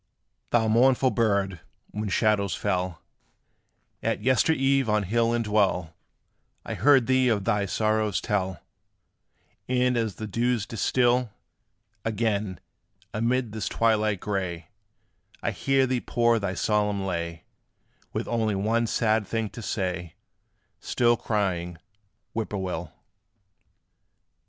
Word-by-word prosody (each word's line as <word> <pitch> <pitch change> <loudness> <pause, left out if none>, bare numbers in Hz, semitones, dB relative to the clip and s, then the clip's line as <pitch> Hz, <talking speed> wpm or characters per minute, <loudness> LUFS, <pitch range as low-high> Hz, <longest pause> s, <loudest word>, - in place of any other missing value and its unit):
Thou 115 -2 +2
mournful 130 +3 +4
bird, 100 -5 +1 0.3
when 105 0 -3
shadows 100 -3 +2
fell 90 -3 -2 1.0
At - - -1
yester 130 +5 +3
eve 135 -4 +2
on 105 -1 +2
hill 115 +4 +1
and 120 -1 0
dell, 95 -6 +1 0.7
I - - -4
heard 135 -4 +4
thee 130 0 +3
of 105 -4 +1
thy 105 -3 +1
sorrows 110 0 +1
tell; 95 -4 -2 1.1
And, 125 0 +2
as 115 -4 -1
the 110 - -6
dews 115 +1 0
distil, 120 +2 +1 0.7
Again, 105 -4 -1 0.5
amid 120 +1 0
this 110 -2 -3
twilight 110 -3 +1
gray, 90 -5 -3 0.7
I 115 - 0
hear 135 +9 +2
thee 125 -1 -1
pour 120 -1 +2
thy 100 -2 -2
solemn 105 0 0
lay, 85 -2 -3 0.7
With - - -3
only 110 -3 0
one 115 +4 +1
sad 110 -2 +1
thing 115 -2 -2
to 115 - -8
say, 90 -5 -3 0.6
Still 120 -2 +2
crying, 90 -7 -2 0.6
"Whip 110 -1 -2
poor 100 - -3
will." 90 -4 -4
110 Hz, 120 wpm, -26 LUFS, 95-120 Hz, 1.1 s, mournful